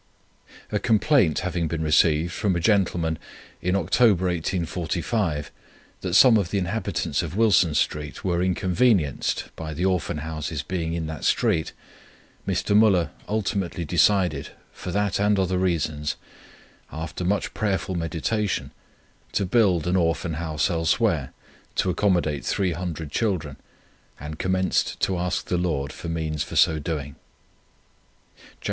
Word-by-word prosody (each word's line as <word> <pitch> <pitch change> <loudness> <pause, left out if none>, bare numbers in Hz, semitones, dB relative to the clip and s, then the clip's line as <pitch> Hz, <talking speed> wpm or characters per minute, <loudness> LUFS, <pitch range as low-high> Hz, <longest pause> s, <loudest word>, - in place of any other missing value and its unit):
A - - +1
complaint 110 - +3
having 85 -2 -1
been 80 0 -3
received 80 +2 +3
from 100 -2 0
a - - 0
gentleman 85 -4 +1 0.4
in 90 +1 0
October, 100 -2 +3
1845, 85 -1 -1 0.5
that 90 -1 -2
some 120 0 +8
of 95 -5 0
the 100 - -1
inhabitants 100 +4 -1
of 85 0 -5
Wilson 95 -8 +4
Street 75 -1 -1
were 90 -2 0
inconvenienced 90 - +1
by 80 -1 -6
the 90 +5 -1
Orphan 90 -5 0
Houses 80 0 -4
being 85 -3 -3
in 85 -1 -2
that 80 -1 -6
street, 100 - +1 0.8
Mr. 100 - 0
Müller 100 -6 +4 0.2
ultimately 100 -5 -1
decided 90 -3 +2 0.2
for - - -7
that 100 +1 0
and 105 0 +3
other 95 -1 +1
reasons, 75 -5 -1 0.8
after 80 +2 -5
much 100 +2 0
prayerful 100 -2 -1
meditation, 90 +5 -2 0.6
to 100 - +1
build 95 -5 +3
an 90 +1 +1
Orphan 85 -2 0
House 80 +1 -1
elsewhere 80 -1 +1 0.4
to 90 - +1
accommodate 85 -7 +1
300 85 -4 -2
children, 85 -10 -1 0.6
and 75 +2 -7
commenced 95 0 0
to 95 -2 +1
ask 90 +1 -1
the 90 - -1
Lord 75 -6 -1
for 85 - -7
means 80 -2 -2
for - - -4
so 80 - +4
doing: 75 -2 -4 1.2
"Jan. - - -21
85 Hz, 135 wpm, -24 LUFS, 80-95 Hz, 1.2 s, some